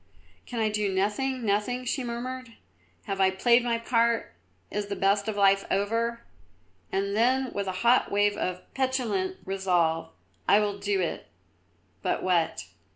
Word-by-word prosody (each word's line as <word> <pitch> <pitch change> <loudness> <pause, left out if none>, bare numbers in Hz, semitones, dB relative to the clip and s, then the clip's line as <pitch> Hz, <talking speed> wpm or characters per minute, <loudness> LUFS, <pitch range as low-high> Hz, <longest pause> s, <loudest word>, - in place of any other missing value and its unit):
"Can 240 - -4
I 220 -1 +2
do 210 -2 0
nothing, 225 +7 -1
nothing?" 215 +5 0
she 260 +2 -1
murmured. 245 +1 -5 0.5
"Have 195 0 -2
I 190 - +5
played 235 +6 +3
my 235 -1 +1
part? 230 0 +1 0.4
Is 205 0 -2
the 200 - -3
best 200 +2 +2
of 215 -2 -2
life 195 -1 +4
over?" 230 +4 0 0.7
and 200 +1 -1
then, 255 +3 +2
with 200 -1 -2
a - - 0
hot 245 +2 +5
wave 205 0 +2
of 180 0 -3
petulant 265 - -1
resolve, 175 -4 +1 0.4
"I 205 - +6
will 205 -1 -1
do 200 -1 0
it, 175 - -3 0.7
but - - -1
what?" 175 -3 +1
210 Hz, 155 wpm, -27 LUFS, 195-240 Hz, 0.7 s, I